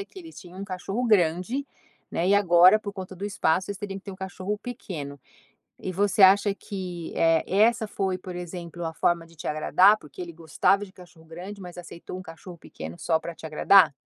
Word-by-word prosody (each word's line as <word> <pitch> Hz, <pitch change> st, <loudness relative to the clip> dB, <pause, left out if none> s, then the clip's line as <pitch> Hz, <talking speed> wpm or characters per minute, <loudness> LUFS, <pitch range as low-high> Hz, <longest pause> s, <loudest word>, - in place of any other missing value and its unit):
é 395 Hz, -, -4 dB
que 385 Hz, -, -14 dB
eles 325 Hz, -2 st, -11 dB
tinham 180 Hz, -1 st, -12 dB
um -, -, -4 dB
cachorro 195 Hz, +5 st, -3 dB
grande, 195 Hz, -, +2 dB, 0.4 s
né, 175 Hz, +3 st, 0 dB
e 200 Hz, -, +5 dB
agora, 185 Hz, +1 st, +6 dB
por 205 Hz, -1 st, -6 dB
conta 190 Hz, -1 st, -8 dB
do 195 Hz, -, -6 dB
espaço, 190 Hz, -3 st, +1 dB
vocês 200 Hz, -1 st, -5 dB
teriam 195 Hz, -1 st, -5 dB
que -, -, -18 dB
ter 200 Hz, -, -7 dB
um -, -, -10 dB
cachorro 190 Hz, +2 st, -4 dB
pequeno. 165 Hz, -, -7 dB, 0.6 s
E 185 Hz, -, -4 dB
você 200 Hz, +2 st, +2 dB
acha 200 Hz, +2 st, +6 dB
que, 180 Hz, -5 st, -6 dB
eh, 165 Hz, -1 st, +3 dB
essa 220 Hz, +3 st, +3 dB
foi, 190 Hz, -2 st, -2 dB
por 180 Hz, -1 st, -8 dB
exemplo, 175 Hz, -1 st, -7 dB
a 160 Hz, -, -3 dB
forma 170 Hz, 0 st, +1 dB
de 165 Hz, -, -20 dB
te -, -, -8 dB
agradar, 185 Hz, +7 st, +5 dB
porque 150 Hz, +2 st, -13 dB
ele 170 Hz, -1 st, -6 dB
gostava 170 Hz, +5 st, +1 dB
de 185 Hz, -, -15 dB
cachorro 175 Hz, -3 st, -16 dB
grande, 185 Hz, +5 st, -9 dB
mas 180 Hz, -1 st, -9 dB
aceitou 175 Hz, 0 st, -9 dB
um -, -, -8 dB
cachorro 170 Hz, +1 st, -11 dB
pequeno 80 Hz, -, -9 dB
só 160 Hz, -1 st, +1 dB
para 170 Hz, 0 st, -7 dB
te 160 Hz, -, -8 dB
agradar? 170 Hz, +3 st, +5 dB
185 Hz, 215 wpm, -26 LUFS, 170-200 Hz, 0.6 s, agora